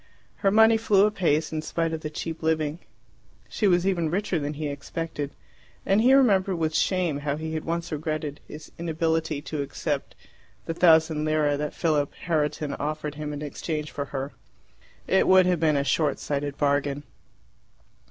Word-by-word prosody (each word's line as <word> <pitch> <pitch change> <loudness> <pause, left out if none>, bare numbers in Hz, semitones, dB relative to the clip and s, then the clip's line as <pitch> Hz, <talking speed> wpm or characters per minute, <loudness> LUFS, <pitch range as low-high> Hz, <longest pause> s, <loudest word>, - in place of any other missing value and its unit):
Her 195 - +2
money 220 +2 +6
flew 205 -3 +4
apace, 165 -7 +1
in 155 - -1
spite 165 +1 -2
of 160 - -4
the 150 - -4
cheap 165 +1 -5
living. 160 -1 0 0.7
She 210 - 0
was 175 -1 +3
even 175 -5 +1
richer 190 0 -1
than 145 0 -3
he 150 +1 -3
expected; 145 +1 -4 0.6
and 195 +3 +3
he 250 +3 +5
remembered 200 -8 +4
with 160 -2 -1
shame 180 -6 +1
how 145 -1 -2
he 160 0 -5
had 155 0 -3
once 170 +1 -3
regretted 155 -1 -3
his 155 +1 -10
inability 160 -2 -1
to 155 -2 -3
accept 140 - -3 0.5
the 165 - -2
thousand 160 -2 +4
lire 155 -2 +2
that 150 +1 -4
Philip 150 -4 0
Herriton 150 -3 0
offered 150 0 -3
him 150 0 -5
in 145 0 -5
exchange 150 +1 -4
for 140 - -4
her. 135 0 -5 0.7
It 190 - +3
would 185 -1 +6
have 180 -2 +2
been 155 -2 +3
a 140 - +1
shortsighted 145 -1 -1
bargain. 145 0 0
155 Hz, 165 wpm, -26 LUFS, 150-170 Hz, 0.7 s, money